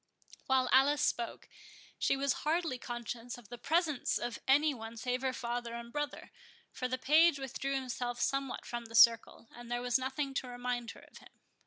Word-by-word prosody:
While 260 -2 +3
Alice 285 +3 +5
spoke, 235 -5 -1 0.5
she 275 - +2
was 275 -1 +1
hardly 315 -4 0
conscious 240 0 -6
of 240 -4 -15
the 240 0 -8
presence 310 0 +1
of 240 -1 -4
any 290 +3 +4
one 225 -2 -8
save 250 +2 -2
her 265 -1 0
father 240 -1 -4
and 235 0 -8
brother; 295 -1 -4 0.4
for 255 - -3
the 255 +1 -2
page 310 +4 +5
withdrew 275 0 -3
himself 245 -2 -3
somewhat 275 -2 -1
from 240 -1 -5
the 230 0 -9
circle, 230 0 +5
and 240 0 -11
there 240 0 -2
was 250 +1 +2
nothing 270 +2 -3
to 265 - -2
remind 245 -1 -3
her - - -10
of - - -15
him. - - -19
255 Hz, 185 wpm, -33 LUFS, 240-275 Hz, 0.5 s, Alice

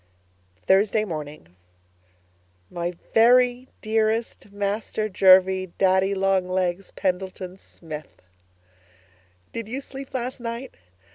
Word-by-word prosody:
Thursday 210 +3 +3
Morning 150 - -7 1.2
My 175 +1 -3 0.2
Very 245 +2 +4 0.2
Dearest 220 -1 -1
Master 205 +2 -2
Jervie 185 -1 +4
Daddy 190 +1 +3
Long 190 -1 +1
Legs 185 0 -1
Pendleton 185 -1 -3
Smith, 155 -4 -10 1.3
Did 230 -2 -5
you 250 +5 -4
sleep 275 -1 -9
last 255 +1 -3
night? 235 +2 -6
195 Hz, 90 wpm, -24 LUFS, 185-225 Hz, 1.3 s, Very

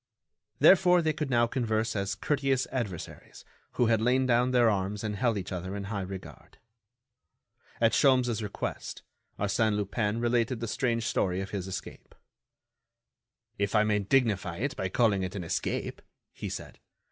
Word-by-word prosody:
Therefore 180 +4 +6
they 155 -1 +1
could 150 -2 -3
now 120 -2 +3
converse 115 -2 -1
as 100 -1 -1
courteous 135 +2 0
adversaries 105 -10 -6 0.3
who 120 - +2
had 115 -1 +2
lain 130 +3 +2
down 125 0 +3
their 125 -2 +4
arms 100 0 -1
and 105 -1 -2
held 115 +1 +1
each 95 -1 -5
other 95 +1 -4
in 100 - -4
high 100 0 -3
regard. 95 0 -9 1.2
At 115 -1 +4
Sholmes' 125 -5 +3
request, 105 -1 -5 0.3
Arsène 105 +2 +1
Lupin 105 +2 -1
related 120 0 +1
the 115 - -3
strange 115 0 -1
story 95 -5 0
of 95 0 -5
his 95 -3 -4
escape. 95 - -8 1.4
"If 100 +1 0
I 105 - +5
may 105 -1 +1
dignify 100 -5 +1
it 135 +6 -2
by 95 - -2
calling 105 -2 +2
it 95 +1 -4
an 95 - -4
escape," 85 - -3 0.3
he - - -6
said. - - -7
110 Hz, 160 wpm, -29 LUFS, 100-125 Hz, 1.4 s, Therefore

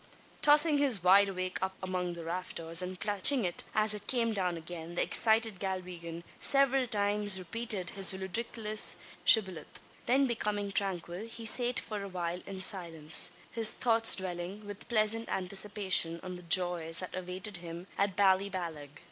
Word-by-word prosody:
Tossing 295 0 +5
his 255 -10 +3
wide 195 +2 +5
awake 185 -1 -5
up 190 0 -3
among 180 -2 -4
the 170 - -9
rafters, 170 -1 0
and 185 0 -6
catching 210 +4 +3
it 175 - -2
as 215 0 +2
it 205 -1 -9
came 230 -3 0
down 180 -4 -2
again, 165 0 -9
the - - 0
excited 220 -3 +2
Galwegian 180 -3 -6 0.2
several 270 -2 +2
times 205 -2 +2
repeated 190 0 -1
his 195 -1 +5
ludicrous 215 +3 +1 0.3
shibboleth. 190 -7 +3 0.3
Then 270 +3 +2
becoming 210 -4 -3
tranquil 190 0 -4
he 230 0 -9
sate 245 +2 +1
for 210 -2 -7
awhile 180 -2 -5
in 190 -1 -6
silence 165 -5 +2 0.2
his 225 -2 +2
thoughts 225 -2 +3
dwelling 185 +2 -6
with 205 0 -10
pleasant 225 0 +1
anticipation 190 -3 -1
on 180 -1 -7
the 180 - -11
joys 170 -2 +1
that 185 - -6
awaited 185 +2 -6
him 170 0 -9
at 200 -1 -1
Ballyballagh. 185 -7 -1
190 Hz, 150 wpm, -30 LUFS, 180-215 Hz, 0.3 s, Tossing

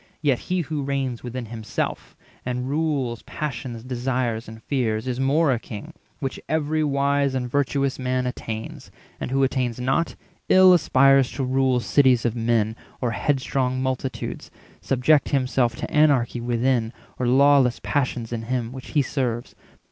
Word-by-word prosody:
Yet 140 -5 +2
he 180 0 +1
who 155 -2 -3
reigns 135 -3 -2
within 125 0 -5
himself, 110 -1 -4 0.3
and 125 0 -3
rules 140 -5 -1
Passions, 120 -5 -5
desires, 125 -2 -2
and 110 +1 -11
fears, 115 -4 -1
is 125 0 -2
more 140 +3 +3
a 120 - +1
king— 120 +9 -9 0.3
Which 135 -3 -4
every 155 0 0
wise 140 -1 +1
and 125 -1 -1
virtuous 140 +1 0
man 130 0 -1
attains; 110 -3 -6 0.3
And - - -4
who 135 +1 +2
attains 130 -3 0
not, 135 +7 0 0.3
ill 185 0 +8
aspires 135 -5 +4
to 135 +2 -2
rule 130 -1 +2
Cities 130 -3 +3
of 120 -1 0
men, 115 -2 +1 0.2
or 120 -2 -1
headstrong 130 +1 0
multitudes, 130 0 -3 0.3
470 - - -21
Subject 135 +3 +3
himself 130 -3 +1
to - - -6
anarchy 140 -6 +3
within, 120 -1 0 0.3
Or 125 - 0
lawless 135 -1 +4
passions 125 -4 -1
in 115 - -3
him, 120 0 -2
which 130 0 -9
he 145 -3 +3
serves. 125 -3 -2
130 Hz, 155 wpm, -23 LUFS, 120-140 Hz, 0.3 s, ill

